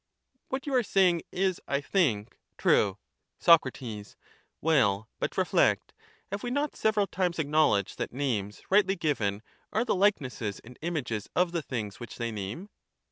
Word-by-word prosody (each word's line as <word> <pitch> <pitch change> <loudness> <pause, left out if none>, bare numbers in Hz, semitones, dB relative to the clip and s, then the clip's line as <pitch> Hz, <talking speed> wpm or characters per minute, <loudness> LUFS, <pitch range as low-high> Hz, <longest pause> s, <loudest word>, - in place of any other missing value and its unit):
What 265 +1 -3
you 285 - -3
are 255 - +5
saying 185 -6 +3
is, 185 -1 0
I 140 - +1
think, 130 - 0 0.2
true. 100 -1 +3 0.4
439 130 -10 +3
Sac. - - -20 0.4
Well, 110 -10 +2
but - - -3
reflect; - - +2 0.4
have 200 +1 -3
we 245 - -3
not 285 +3 -1
several 215 -2 +2
times 180 -2 -1
acknow 155 0 +3
ledged 100 -2 -2
that - - -2
names 115 -7 -2
rightly 195 -1 +4
given 115 - -1 0.3
are 225 +3 +1
the 230 - +1
likenesses 140 - 0
and 125 +2 -13
images 130 - -3
of 180 0 +3
the 170 -1 -1
things 110 -8 -5
which 120 - -8
they 115 -1 -2
name? 110 - -6
150 Hz, 160 wpm, -29 LUFS, -, 0.4 s, are